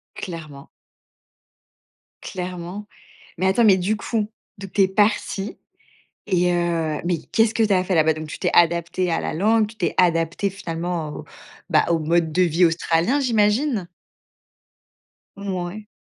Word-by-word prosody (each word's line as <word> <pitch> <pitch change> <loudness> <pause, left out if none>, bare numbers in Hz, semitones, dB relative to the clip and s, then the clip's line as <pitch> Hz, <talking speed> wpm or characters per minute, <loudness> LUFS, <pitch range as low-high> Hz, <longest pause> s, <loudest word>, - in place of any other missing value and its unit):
Clairement. 155 -6 -8 1.5
Clairement. 180 +2 -6 0.5
Mais 185 +3 +1
attends, 195 +5 +3
mais 195 -3 +6
du 190 +4 0
coup, 215 0 -2 0.3
donc 195 -2 -9
tu 200 - +3
es 190 - +5
partie 205 0 0 0.7
et 180 -1 +2
heu, 165 -3 0
mais 175 -1 0
qu'est-ce 225 0 +3
que 230 - +2
tu 215 -2 +2
as 185 -1 +3
fait 185 - -1
là-bas? 160 -1 +3
Donc 155 0 -7
tu - - -7
t'es - - 0
adaptée 170 +1 +2
à 165 - 0
la - - -3
langue, 215 +6 +3
tu 220 - -14
t'es 175 -6 -1
adaptée 170 +2 +2
finalement 170 -3 -4
au, - - -8 0.5
bah, - - +4
au 170 - +3
mode 160 +1 +1
de 185 - +3
vie 175 0 +3
australien, 170 - +1
j'imagine? 225 - +1 1.6
Mouais. 190 +2 -4
180 Hz, 150 wpm, -22 LUFS, 165-205 Hz, 1.6 s, mais